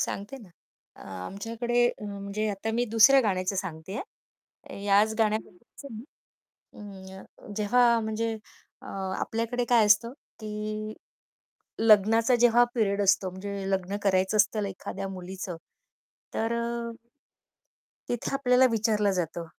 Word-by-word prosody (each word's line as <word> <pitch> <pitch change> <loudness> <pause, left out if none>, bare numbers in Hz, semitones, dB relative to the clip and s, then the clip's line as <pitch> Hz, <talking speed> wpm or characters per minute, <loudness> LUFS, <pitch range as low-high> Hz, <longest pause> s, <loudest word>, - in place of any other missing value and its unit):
सांगते 205 +7 -4
ना. 215 -7 -14 0.5
अ, - - -13 0.2
आमच्याकडे 230 - -1 0.2
म्हणजे 205 +1 -4
आता 205 +2 -4
मी 240 +1 +1
दुसऱ्या 270 +5 +7
गाण्याचं 190 -4 -1
सांगते 185 +1 -5 0.5
आहे, 200 - -13
याच 205 +2 +3
गाण्याबद्दलचं 220 +4 -3
नाही. 220 +3 -8 1.1
अं, 205 +1 -13
जेव्हा 235 +2 +3
म्हणजे 220 +1 -2 0.5
अ, - - -11 0.3
आपल्याकडे 230 +2 -2
काय 230 -3 +5
असतं, 210 +3 +4 0.3
की 215 0 -5 0.9
लग्नाचा 225 +2 +5
जेव्हा 240 0 +6
पिरियड 205 -3 +1
असतो 195 -1 +3
म्हणजे 195 +1 -5
लग्न 190 +1 -1
करायचं 190 +1 +2
असतं 210 +1 +2
एखाद्या 195 +1 -6
मुलीचं 185 -1 -7 0.8
तर 225 +1 -1
अ, 235 0 -3 1.2
तिथे 240 +2 -3
आपल्याला 260 -1 +4
विचारलं 215 -2 +1
जातं, 170 -2 -3
215 Hz, 115 wpm, -27 LUFS, 195-230 Hz, 1.2 s, दुसऱ्या